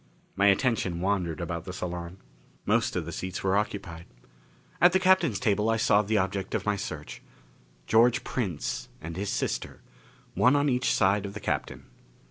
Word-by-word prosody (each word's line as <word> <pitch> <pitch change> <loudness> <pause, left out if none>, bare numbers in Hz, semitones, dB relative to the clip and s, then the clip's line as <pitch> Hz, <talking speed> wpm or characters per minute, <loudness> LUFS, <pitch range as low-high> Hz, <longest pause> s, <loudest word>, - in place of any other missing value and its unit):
My 100 +1 +3
attention 100 -4 +2
wandered 90 -4 -1
about 85 -1 -4
the 90 - -6
salon. 90 -1 -5 0.5
Most 115 +2 +1
of 90 -3 -2
the 85 - -6
seats 95 +1 -5
were 95 0 +2
occupied. 95 -5 -3 0.8
At 175 +1 +6
the 190 - +4
Captain's 185 - +3
table 105 -2 +1
I 115 - +2
saw 105 -2 +4
the 105 +1 0
objects 95 0 -1
of - - -2
my 105 -1 +1
search: 100 - -6 0.6
George 115 - +4
Prince 95 - -3
and 85 +1 -7
his 100 +2 -3
sister, - - -3 0.5
one 125 +3 +4
on 145 0 +2
each 125 -1 +1
side 100 +1 +2
of 100 - -9
the - - -5
Captain. - - -3
100 Hz, 170 wpm, -27 LUFS, 90-115 Hz, 0.8 s, At